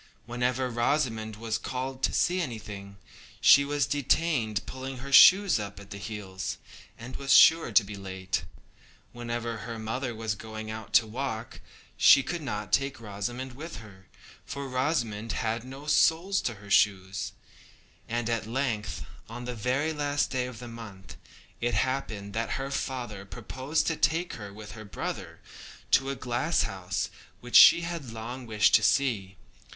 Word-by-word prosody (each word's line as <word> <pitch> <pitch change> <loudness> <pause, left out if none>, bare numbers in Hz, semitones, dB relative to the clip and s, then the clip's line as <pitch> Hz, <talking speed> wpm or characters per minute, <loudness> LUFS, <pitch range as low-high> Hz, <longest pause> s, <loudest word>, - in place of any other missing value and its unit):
Whenever 125 +2 -1
Rosamond 120 -3 0
was 110 0 -3
called 130 +1 -4
to - - +2
see 180 +1 +1
anything, 105 - -7 0.4
she 140 - +7
was 145 0 0
detained 135 -5 0
pulling 130 0 -6
her 140 +2 -8
shoes 190 - +8
up 100 -1 -6
at 100 0 -14
the 100 - -6
heels, 95 -3 -5 0.4
and 120 +2 -8
was 140 0 -2
sure 165 0 +7
to 115 - +6
be 100 +1 -8
too 100 - -8
late. 95 -1 -3 0.7
Whenever 120 -1 -4
her 115 +2 -6
mother 115 +3 -3
was 110 -1 -2
going 110 +1 -7
out 110 -1 -8
to 115 +1 +6
walk, 115 0 -5 0.4
she 135 - +7
could 175 +3 -4
not 120 -8 -5
take 135 -1 +1
Rosamond 120 +5 -5
with 160 +6 -8
her, 95 -4 -13 0.4
for 140 0 -6
Rosamond 125 -5 -1
had 115 +1 -2
no 135 +3 -10
soles 165 +5 +3
to 120 - -2
her 100 0 -13
shoes; 95 -1 +2 0.8
and 120 0 -1
at 115 -2 -1
length, 110 - -2 0.2
on 120 +2 -7
the 125 - -4
very 130 +8 -1
last 145 -1 0
day 125 -1 -1
of 125 -2 -9
the 125 - -8
month, 110 -5 -10 0.4
it 120 +1 0
happened 110 -7 -2
that 115 +1 -2
her 135 0 -4
father 120 -7 -4
proposed 130 +8 -3
to 160 - 0
take 165 +3 +1
her, 100 -2 -8
with 105 +1 -10
her 110 0 -9
brother, 100 - -6 0.5
to 135 - +4
a 140 - -2
glasshouse 110 - -1 0.3
which 125 0 -6
she 170 - +10
had 170 -6 -5
long 115 +3 -7
wished 105 -2 +3
to - - +7
see. 100 -5 +1
120 Hz, 160 wpm, -28 LUFS, 105-135 Hz, 0.8 s, she